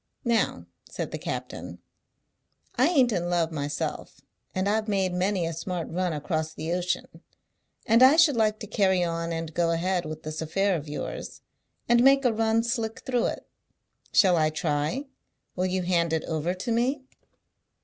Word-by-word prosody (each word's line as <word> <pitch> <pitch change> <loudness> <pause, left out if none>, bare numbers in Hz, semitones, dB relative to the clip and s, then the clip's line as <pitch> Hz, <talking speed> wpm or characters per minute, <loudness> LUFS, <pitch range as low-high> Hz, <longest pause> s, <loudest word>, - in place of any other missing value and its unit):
"Now," 235 -2 +1 0.2
said - - -5
the - - -5
captain, - - -5 1.0
"I 255 +4 +4
ain't 270 -8 +3
in 175 -4 -1
love 170 -2 +1
myself, 145 -1 -4 0.4
and 185 +1 0
I've 215 +1 +1
made 190 -3 0
many 185 0 0
a 165 - -3
smart 170 +1 -4
run 180 +1 -1
across 155 +1 -3
the 160 +2 -3
ocean, 180 0 -1 0.8
and 230 +1 +4
I 260 +3 +8
should 320 -4 +5
like 215 -2 +2
to - - -4
carry 190 -3 +2
on 165 0 -2
and 165 -1 -4
go 170 0 +1
ahead 175 +1 0
with 155 0 -7
this 155 +1 -5
affair 195 +5 +1
of 150 -2 -5
yours, 150 - -6 0.5
and 240 0 +5
make 275 0 +5
a 240 - +4
run 225 +1 +2
slick 230 -2 -2
through 245 -2 0
it. - - -5 0.6
Shall 185 -4 +5
I 155 -1 +3
try? 155 - -1 0.5
Will 185 0 0
you 185 0 -1
hand 170 -2 +1
it 160 - 0
over 165 +3 -2
to 230 +6 -4
me?" 255 +4 0
185 Hz, 170 wpm, -26 LUFS, 165-225 Hz, 1.0 s, I